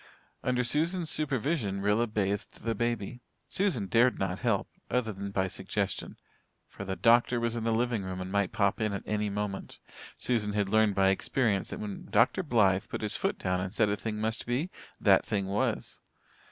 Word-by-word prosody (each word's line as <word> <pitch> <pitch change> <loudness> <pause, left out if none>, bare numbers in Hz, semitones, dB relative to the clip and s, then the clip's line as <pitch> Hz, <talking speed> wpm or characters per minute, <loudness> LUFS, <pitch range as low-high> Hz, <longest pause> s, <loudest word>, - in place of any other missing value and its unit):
Under 125 0 +1
Susan's 165 +6 +1
supervision 135 - 0
Rilla 105 +4 +2
bathed 100 -2 -2
the 115 0 0
baby. 120 +1 -2 0.3
Susan 180 - +1
dared 120 +5 +3
not 95 -1 -2
help, - - +1 0.2
other 115 -3 0
than 100 +1 -5
by 95 -1 0
suggestion, - - -3 0.5
for - - -8
the 95 -1 -3
doctor 120 +5 +4
was 115 0 -1
in 115 -1 -3
the 115 - +2
living 115 -1 +1
room 95 -1 -5
and 90 0 -5
might 100 -2 +1
pop 100 0 +1
in 105 -1 0
at 100 - -4
any 105 0 -1
moment. 100 -1 -4 0.4
Susan 110 -4 0
had 100 -2 0
learned 110 -1 +3
by 95 0 +4
experience 100 +1 +1
that - - -6
when 105 -2 -6
Dr. 190 - +3
Blythe 105 - +3
put - - -4
his 105 -1 0
foot - - -1
down 90 -1 -1
and 95 0 -3
said 110 0 +2
a 100 - +1
thing 105 +2 -4
must 110 +2 -2
be, 135 +9 -1 0.3
that - - +5
thing 100 -2 -1
was. 100 +2 -1
105 Hz, 190 wpm, -30 LUFS, 100-120 Hz, 0.5 s, that